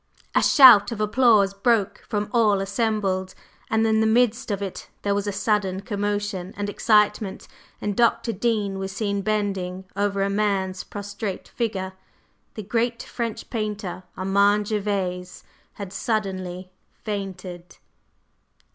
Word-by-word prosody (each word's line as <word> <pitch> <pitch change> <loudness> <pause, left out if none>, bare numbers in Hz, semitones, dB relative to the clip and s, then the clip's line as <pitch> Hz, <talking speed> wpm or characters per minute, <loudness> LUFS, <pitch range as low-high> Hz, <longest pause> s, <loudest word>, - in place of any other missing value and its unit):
A - - +4
shout 240 -8 +8
of 225 - -5
applause 215 -2 +4
broke 205 0 +1
from 210 -1 -1
all 215 -4 +4
assembled, 195 -2 -1 0.3
and 220 0 +2
in 220 0 +3
the 220 - +3
midst 235 +1 +2
of 200 -2 -1
it 195 -2 -6
there 200 - +1
was 200 0 -1
a - - 0
sudden 200 -2 0
commotion 205 -3 -3
and 205 0 -2
excitement, 210 -2 +1 0.3
and 205 -1 -2
Dr. 235 0 +2
Dean 205 -2 -1
was 190 0 -4
seen 200 0 -2
bending 195 -3 -2
over 200 -1 0
a - - +1
man's 195 -2 0
prostrate 205 -1 -6
figure. 195 -5 -3 0.6
The 215 - -5
great 230 +3 -1
French 230 -3 -5
painter, 210 -5 -3 0.2
Armand 200 +2 +2
Gervase, 190 -4 -2 0.3
had 200 -2 -8
suddenly 185 -4 -3 0.3
fainted. 185 -4 -6
205 Hz, 130 wpm, -24 LUFS, 195-215 Hz, 0.6 s, shout